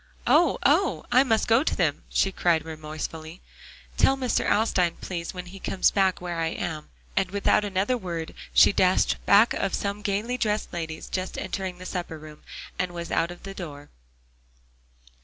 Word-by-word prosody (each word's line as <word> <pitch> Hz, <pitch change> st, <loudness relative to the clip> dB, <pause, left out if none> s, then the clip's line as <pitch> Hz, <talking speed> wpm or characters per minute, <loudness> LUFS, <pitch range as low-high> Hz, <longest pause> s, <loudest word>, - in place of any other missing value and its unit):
"Oh! 340 Hz, -5 st, +4 dB
oh! 320 Hz, +2 st, +2 dB
I 255 Hz, +2 st, +6 dB
must 225 Hz, -4 st, +1 dB
go 230 Hz, +4 st, +4 dB
to -, -, 0 dB
them," 160 Hz, -6 st, 0 dB
she 195 Hz, -, +1 dB
cried 170 Hz, -4 st, +1 dB
remorsefully. 155 Hz, +1 st, -7 dB, 0.6 s
"Tell 270 Hz, -, +4 dB
Mr. 255 Hz, -2 st, 0 dB
Alstyne, 185 Hz, -5 st, +2 dB
please, 170 Hz, -2 st, -5 dB
when 180 Hz, -1 st, -7 dB
he 190 Hz, +2 st, -11 dB
comes 185 Hz, -, +1 dB
back, 190 Hz, -2 st, +2 dB
where 175 Hz, -1 st, -4 dB
I 165 Hz, -, +1 dB
am," 160 Hz, -2 st, -4 dB, 0.3 s
and 190 Hz, -1 st, +1 dB
without 200 Hz, +1 st, +2 dB
another 205 Hz, +4 st, 0 dB
word 170 Hz, -7 st, -5 dB, 0.2 s
she -, -, +6 dB
dashed 185 Hz, -1 st, +2 dB
back 205 Hz, +4 st, +6 dB
of 195 Hz, -, -1 dB
some 200 Hz, +1 st, -3 dB
gaily 215 Hz, +5 st, -1 dB
dressed 215 Hz, -2 st, -1 dB
ladies 160 Hz, -2 st, -5 dB
just 185 Hz, 0 st, -4 dB
entering 190 Hz, -2 st, -4 dB
the 185 Hz, -, -10 dB
supper 175 Hz, -3 st, -4 dB
room, 155 Hz, 0 st, -12 dB, 0.4 s
and 185 Hz, -1 st, -1 dB
was 170 Hz, -1 st, -6 dB
out 165 Hz, -, +1 dB
of 175 Hz, -, -10 dB
the 195 Hz, 0 st, -7 dB
door. 145 Hz, -6 st, -8 dB
185 Hz, 175 wpm, -26 LUFS, 165-205 Hz, 0.6 s, I